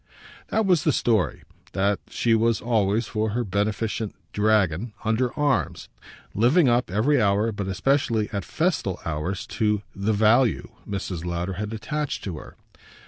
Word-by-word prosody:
That 220 Hz, 0 st, +1 dB
was 180 Hz, -4 st, +3 dB
the 155 Hz, -, +3 dB
story 115 Hz, -8 st, +1 dB, 0.3 s
that 100 Hz, +1 st, +1 dB
she 115 Hz, -, +1 dB
was 115 Hz, 0 st, +2 dB
always, 110 Hz, -1 st, +1 dB
for 110 Hz, +1 st, -1 dB
her 120 Hz, -, +1 dB
beneficent 105 Hz, +2 st, -2 dB, 0.2 s
dragon, 105 Hz, -1 st, +1 dB
under 115 Hz, +3 st, +1 dB
arms; 145 Hz, -3 st, 0 dB, 0.4 s
living 130 Hz, -, +4 dB
up, 120 Hz, -2 st, +2 dB
every 120 Hz, +8 st, +2 dB
hour, 105 Hz, +2 st, +2 dB
but 100 Hz, -2 st, -4 dB
especially 110 Hz, +2 st, +1 dB
at 100 Hz, -2 st, -2 dB
festal 155 Hz, -, -1 dB
hours, 80 Hz, +4 st, -3 dB, 0.2 s
to 105 Hz, -1 st, +2 dB
the 100 Hz, +2 st, 0 dB
"value" 110 Hz, +3 st, +3 dB, 0.2 s
Mrs. 95 Hz, -4 st, -4 dB
Lowder 85 Hz, +2 st, -2 dB
had 105 Hz, +3 st, -4 dB
attached 150 Hz, +6 st, -3 dB
to 85 Hz, -6 st, -5 dB
her. -, -, -13 dB
110 Hz, 145 wpm, -24 LUFS, 100-120 Hz, 0.4 s, living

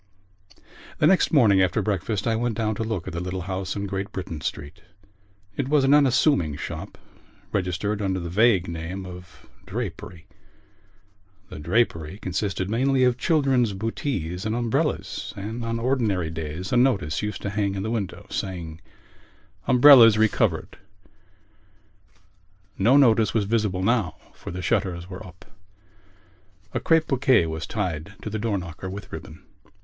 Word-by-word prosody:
The -, -, +2 dB
next 190 Hz, -, +4 dB
morning 110 Hz, -, +5 dB
after 90 Hz, -2 st, +2 dB
breakfast 105 Hz, 0 st, -2 dB
I 115 Hz, -1 st, +1 dB
went 115 Hz, -1 st, -1 dB
down 110 Hz, -1 st, 0 dB
to 110 Hz, -, -3 dB
look 110 Hz, -6 st, -3 dB
at -, -, -5 dB
the 85 Hz, -, -3 dB
little 90 Hz, +1 st, -4 dB
house 95 Hz, +1 st, -4 dB
in 100 Hz, -1 st, -3 dB
Great 95 Hz, 0 st, -4 dB
Britain 85 Hz, -5 st, -6 dB
Street. 75 Hz, +8 st, -5 dB, 0.7 s
It 135 Hz, +2 st, -2 dB
was 150 Hz, -2 st, +3 dB
an 135 Hz, +1 st, +4 dB
unassuming 135 Hz, -, +3 dB
shop, -, -, -7 dB, 0.5 s
registered 100 Hz, +3 st, -1 dB
under 95 Hz, -2 st, -1 dB
the 85 Hz, -, -5 dB
vague 105 Hz, -2 st, +3 dB
name 85 Hz, +3 st, -5 dB
of 90 Hz, -2 st, -12 dB, 0.2 s
Drapery. 85 Hz, -1 st, -6 dB, 1.2 s
The -, -, -8 dB
drapery 85 Hz, -1 st, 0 dB
consisted 95 Hz, -1 st, -2 dB
mainly 130 Hz, +5 st, +2 dB
of 125 Hz, 0 st, +2 dB
children's 135 Hz, -, +2 dB
bootees 95 Hz, -, -3 dB
and 110 Hz, +1 st, -1 dB
umbrellas; 120 Hz, -2 st, -2 dB
and 110 Hz, +4 st, -5 dB
on 115 Hz, 0 st, -2 dB
ordinary 110 Hz, -10 st, 0 dB
days 80 Hz, +4 st, -5 dB
a -, -, +4 dB
notice 100 Hz, -, +2 dB
used 105 Hz, 0 st, -4 dB
to 100 Hz, -, -2 dB
hang 100 Hz, -1 st, -1 dB
in 95 Hz, -, -3 dB
the 110 Hz, -, -2 dB
window, 105 Hz, -5 st, -4 dB
saying: 85 Hz, -4 st, -5 dB, 0.9 s
Umbrellas 125 Hz, -4 st, +8 dB
Re 110 Hz, 0 st, +5 dB
covered. -, -, -1 dB, 2.0 s
No 120 Hz, +8 st, +4 dB
notice 115 Hz, -6 st, +4 dB
was 105 Hz, -3 st, +2 dB
visible 105 Hz, -4 st, 0 dB
now 110 Hz, -4 st, +1 dB, 0.2 s
for -, -, -10 dB
the 90 Hz, +1 st, -5 dB
shutters 90 Hz, -4 st, -1 dB
were 95 Hz, 0 st, -8 dB
up. 90 Hz, 0 st, -14 dB, 1.3 s
A -, -, 0 dB
crape 165 Hz, -1 st, +3 dB
bouquet 130 Hz, -, +3 dB
was 80 Hz, 0 st, -4 dB
tied 90 Hz, -3 st, -4 dB
to 110 Hz, -, -5 dB
the 110 Hz, -, -3 dB
door 105 Hz, -2 st, -1 dB
knocker 90 Hz, +1 st, -7 dB
with 100 Hz, +2 st, -8 dB
ribbon. -, -, -9 dB
100 Hz, 155 wpm, -24 LUFS, 90-115 Hz, 2.0 s, Umbrellas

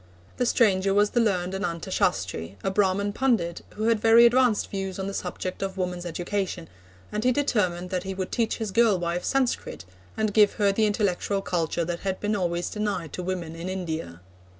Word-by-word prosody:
The 250 Hz, -, +1 dB
stranger 195 Hz, -5 st, +3 dB
was 205 Hz, 0 st, +3 dB
the 240 Hz, -, +2 dB
learned 185 Hz, -5 st, +1 dB
Ananta 190 Hz, -2 st, -3 dB
Shastri, 95 Hz, -, -1 dB
a 195 Hz, -, 0 dB
Brahman 200 Hz, +1 st, +1 dB
pundit, 210 Hz, -10 st, 0 dB
who 215 Hz, -, -4 dB
had 225 Hz, -1 st, +3 dB
very 225 Hz, +2 st, +7 dB
advanced 240 Hz, -2 st, +3 dB
views 195 Hz, -2 st, -3 dB
on 190 Hz, -, -3 dB
the 200 Hz, -, -4 dB
subject 185 Hz, 0 st, -4 dB
of 195 Hz, 0 st, -3 dB
woman's 180 Hz, -1 st, -3 dB
education, 180 Hz, 0 st, -3 dB, 0.4 s
and 210 Hz, +1 st, -2 dB
he 255 Hz, -, +4 dB
determined 195 Hz, -10 st, 0 dB
that 185 Hz, -1 st, 0 dB
he 190 Hz, +1 st, -5 dB
would 185 Hz, 0 st, -4 dB
teach 230 Hz, -2 st, 0 dB
his 220 Hz, -3 st, -3 dB
girl 220 Hz, -1 st, +4 dB
wife 175 Hz, 0 st, -2 dB
Sanskrit, 265 Hz, -, -1 dB, 0.3 s
and 215 Hz, -2 st, 0 dB
give 210 Hz, -1 st, +5 dB
her 205 Hz, -2 st, +2 dB
the 215 Hz, +2 st, +2 dB
intellectual 200 Hz, -1 st, 0 dB
culture 170 Hz, -1 st, -1 dB
that 170 Hz, 0 st, -3 dB
had 190 Hz, -1 st, -3 dB
been 210 Hz, +1 st, 0 dB
always 175 Hz, -2 st, -1 dB
denied 205 Hz, -7 st, -3 dB
to -, -, -4 dB
women 175 Hz, -3 st, -4 dB
in 170 Hz, +2 st, -5 dB
India. 160 Hz, -, -4 dB
195 Hz, 195 wpm, -26 LUFS, 175-210 Hz, 0.4 s, very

